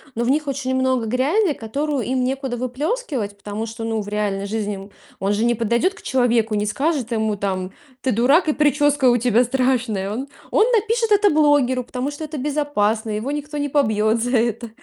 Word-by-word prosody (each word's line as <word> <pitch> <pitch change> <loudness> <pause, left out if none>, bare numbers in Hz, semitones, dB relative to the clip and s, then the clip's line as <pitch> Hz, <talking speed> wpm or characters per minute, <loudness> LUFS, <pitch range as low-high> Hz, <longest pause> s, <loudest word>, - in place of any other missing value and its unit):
но 235 - -1
в - - 0
них 300 +2 +1
очень 265 -1 -2
много 260 -3 +1
грязи, 295 - +2
которую 275 +4 -2
им 255 0 0
некуда 265 -1 -2
выплескивать, 255 - -3
потому 205 +2 -5
что, 225 0 -7
ну, 225 -1 -1
в 205 - -8
реальной 205 -1 -1
жизни 210 0 -2
ему 195 +1 -9 0.3
он 195 +1 0
же 215 - 0
не 240 0 +2
подойдет 235 - +1
к - - -14
человеку, 235 -4 +1
не 205 - 0
скажет 270 +1 -1
ему 220 -2 0
там: 190 -2 -3 0.3
"Ты 260 - 0
дурак, 270 - +3
и - - +3
прическа 290 -2 +3
у 240 - +4
тебя 240 0 +3
страшная". 250 -6 0
Он 260 +6 -4 0.2
он 445 -1 +4
напишет 455 0 +1
это 410 0 +5
блогеру, 290 -4 +3
потому 255 +4 -4
что 290 +2 -7
это 305 0 -6
безопасно, 255 -7 0
его 215 +6 -2
никто 295 0 -4
не 290 0 -1
побьет 220 -5 +2
за 245 +1 +1
это. 230 0 -1
250 Hz, 200 wpm, -21 LUFS, 220-290 Hz, 0.3 s, это